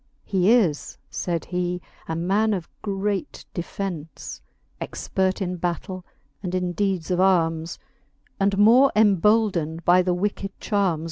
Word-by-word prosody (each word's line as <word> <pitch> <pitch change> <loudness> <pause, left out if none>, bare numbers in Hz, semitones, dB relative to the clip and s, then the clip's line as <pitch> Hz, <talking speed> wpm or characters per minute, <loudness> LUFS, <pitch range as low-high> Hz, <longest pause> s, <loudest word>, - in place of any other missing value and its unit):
He 190 +1 +2
is, 190 - +2
faid 170 -2 -2
he, 180 0 -2 0.3
a 160 - -2
man 200 +6 +1
of 175 -4 -5
great 200 -1 -3
defence; 175 -3 -5 0.4
Expert 190 +1 -1
in 180 0 -3
battell 180 +2 -3 0.4
and 185 -2 -3
in 180 -1 -1
deedes 190 -4 -1
of 180 - +1
armes; 165 -3 +2 0.6
And 195 0 +2
more 240 +7 +6
emboldned 200 -5 +3
by 180 +1 +6
the 180 -1 0
wicked 195 +1 -3
charmes. 195 -6 +1
185 Hz, 130 wpm, -24 LUFS, 175-200 Hz, 0.6 s, more